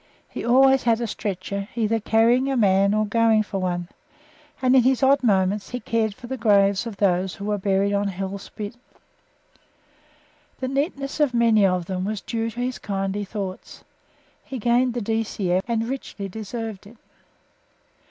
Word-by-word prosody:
He - - -7
always 265 +2 +5
had 230 -1 +2
a 240 - -1
stretcher, 200 -1 -4
either 225 -1 +1
carrying 230 +5 +3
a 270 - 0
man 200 -2 +4
or 215 0 +2
going 225 0 +3
for 200 -2 -4
one, 175 -2 -2 0.7
and 255 0 +3
in 260 - +7
his 260 +2 +2
odd 275 +1 +5
moments 200 -3 +1
he 250 - -4
cared 220 -3 -1
for 245 - -12
the 265 +2 -4
graves 200 -2 +3
of 215 -4 -7
those 185 -1 +1
who 200 - -7
were 210 -1 -1
buried 195 +1 +1
on 200 0 +1
Hell 195 +1 -4
Spit. 205 +2 -7 1.9
The 260 - -2
neatness 275 +1 -2
of 285 -5 +2
many 225 -4 +4
of 180 -2 -1
them 185 0 -3
was 210 +1 -2
due 230 -1 -3
to 235 +2 -6
his 250 +1 -3
kindly 195 0 -3
thought. 195 -2 -7 0.6
He 265 - -6
gained 240 +2 +2
the 240 - -1
D.C.M., 205 -4 -1
and 230 -1 -1
richly 245 -6 -5
deserved 220 0 -6
it. 230 +3 -16
215 Hz, 170 wpm, -23 LUFS, 195-240 Hz, 1.9 s, in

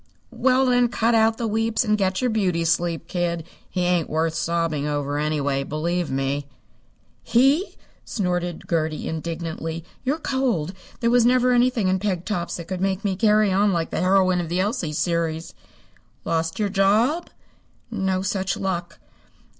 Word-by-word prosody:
"Well, 260 0 +3
then, 245 -1 +4
cut 235 0 +1
out 225 0 +3
the 235 - -2
weeps 225 +1 +1
and 210 -1 +3
get 190 -1 0
your 250 -2 +1
beauty 180 -6 +1
sleep, 170 0 0
kid. 170 -2 -1 0.3
He 180 - -2
ain't 175 -2 +1
worth 160 +1 0
sobbing 165 -3 -1
over, 145 -1 -1
anyway, 145 -2 0
believe 170 +4 -2
me." 135 +1 -1 0.7
"He!" 275 - +2 0.3
snorted 175 -4 -2
Gertie 160 -2 -1
indignantly. 165 0 -4 0.2
"You're 275 +4 0
cold. 250 - -1 0.3
There 235 0 +2
never 245 +1 +4
was 250 - +4
anything 245 -4 +2
in 185 0 +2
peg 185 -3 -2
tops 175 -5 -2
that 170 -1 -8
could 185 -1 -4
make 195 +2 -1
me 195 -2 +1
carry 210 0 +3
on 200 +1 +3
like 165 -1 -1
the - - -1
heroine 185 -1 +3
of 165 - -5
the 175 +2 0
Elsie 190 -5 -1
series." 165 0 -1 0.7
"Lost 165 0 -1
your 210 -2 0
job?" 215 - +2 0.6
"No 190 -3 -1
such 190 0 -1
luck." 175 -3 -3
185 Hz, 160 wpm, -23 LUFS, 165-220 Hz, 0.7 s, then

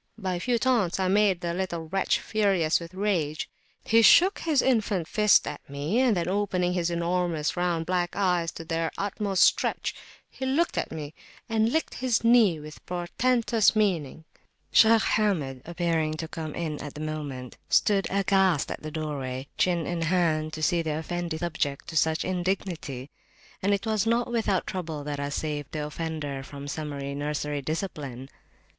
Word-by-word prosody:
By 190 -4 -2
a 175 - -2
few 240 +6 +1
taunts, 230 -8 +1
I 190 - +1
made 200 -2 +3
the 170 -1 -2
little 170 -3 -3
wretch 195 +3 +1
furious 195 -7 +1
with 170 +1 -10
rage; 175 -6 -1 0.4
he 230 +1 +4
shook 365 - +6
his 310 -5 +2
infant 215 -9 +1
fist 210 +1 +4
at - - -5
me, 145 - -1
and 250 -6 +3
then 170 -1 -1
opening 185 -2 0
his 175 -1 0
enormous 170 -2 0
round 175 -2 0
black 175 0 -1
eyes 180 -4 +1
to 165 - -8
their 165 0 -1
utmost 200 -1 +1
stretch, - - +2 0.3
he - - -9
looked 280 +6 +1
at - - -2
me, 155 -1 -6 0.3
and 225 0 +1
licked 320 +3 0
his 250 -3 0
knee 230 -8 +5
with 150 0 -11
portentous 225 +6 +2
meaning. 170 -8 0 0.5
Shaykh 225 0 +6
Hamid, 155 -12 0
happening 165 -3 0
to 160 +1 -5
come 155 -2 -6
in 155 -3 -3
at 145 - -7
the - - -7
moment, 145 -5 -5
stood 200 -2 +3
aghast 190 -5 +2
at - - -5
the 155 - -5
doorway, 140 -4 -4
chin 175 -3 +2
in 175 -1 -2
hand, 165 -2 +1
to 155 - -5
see 170 +1 +2
the 155 -2 -2
Effendi 170 0 -3
subject 155 -4 -2
to 160 - -8
such 160 0 +2
indignity; 175 -7 -3 0.5
and 200 - +1
it 200 +2 0
was 220 -1 0
not 235 +1 +1
without 220 -5 +1
trouble 160 -5 -4
that 145 -1 -4
I 140 0 -2
saved 145 -1 -4
the 150 -2 -2
offender 150 -3 -4
from 140 +1 -9
summary 140 -2 -4
nursery 145 0 -2
discipline. 140 -5 -5
170 Hz, 170 wpm, -27 LUFS, 155-200 Hz, 0.5 s, shook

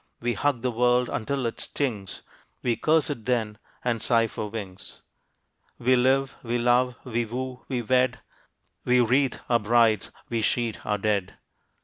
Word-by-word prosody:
We 120 0 0
hug 140 -4 0
the 125 - +1
world 125 +1 +2
until 135 +3 -2
it 115 - -3
stings, 110 -9 -3 0.4
We 120 -2 +1
curse 155 +1 +2
it 115 -7 -6
then 110 -4 -1 0.2
and 120 -2 0
sigh 115 -2 +3
for 105 -1 -5
wings. 100 -4 -8 0.7
We 130 +2 +3
live, 130 +2 +2
we 120 0 -1
love, 125 +1 +2
we 120 -1 -1
woo, 125 +2 -5
we 125 -3 -2
wed, 125 +1 +2 0.7
We 125 0 +3
wreathe 130 +3 +3
our 120 -1 +3
brides, 115 0 +3 0.2
we 115 -1 -1
sheet 115 0 -1
our 105 -1 +1
dead. 100 -2 -1
120 Hz, 155 wpm, -26 LUFS, 110-125 Hz, 0.7 s, sigh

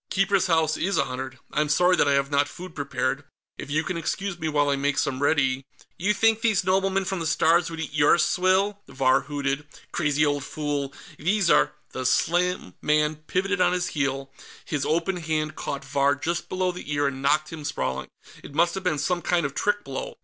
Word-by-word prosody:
"Keeper's 195 -1 +2
House 160 -2 +2
is 195 +3 0
honored. 130 +1 -2
I'm 150 0 0
sorry 180 +4 +4
that - - +3
I 140 - +3
have 140 +1 +1
not 145 0 +3
food 180 +3 -10
prepared; 145 -2 -2 0.4
if - - -7
you 155 +2 +1
can 170 - -3
excuse 185 +3 -3
me 160 -1 -1
while 145 -1 +2
I - - +2
make 140 0 0
some 130 0 -1
ready...." 135 -3 +2 0.3
"You 195 +4 +1
think 225 +1 +3
these 220 -5 +2
noblemen 190 +1 +1
from 190 0 -2
the 165 - -2
Stars 165 +2 +3
would 165 -1 -7
eat 150 -2 -5
your 150 +2 +5
swill?" 190 +3 +2
Vahr 135 0 +2
hooted. 145 0 -2 0.2
"Crazy 150 -2 +1
old 145 -1 0
fool, 145 -2 -3 0.3
these 190 +3 +2
are 150 - +4
" - - -38
The 130 -1 -1
slim 175 - +1
man 150 0 +2
pivoted 195 +1 0
on 180 - +4
his 180 0 -1
heel; 135 -2 -2 0.3
his 145 -4 -2
open 170 +4 0
hand 155 -2 -2
caught 140 - -5
Vahr 140 0 +2
just 170 +4 -3
below 185 0 0
the 175 -4 -8
ear 145 0 +1
and 135 -1 -2
knocked 150 +3 +1
him 155 -2 -7
sprawling. 65 - -3 0.3
It 145 - -11
must 170 +2 +3
have 195 - -4
been 160 -5 +1
some 175 +5 0
kind 175 -2 +1
of 140 - -3
trick 205 +5 0
blow. - - -5
155 Hz, 210 wpm, -25 LUFS, 140-180 Hz, 0.4 s, your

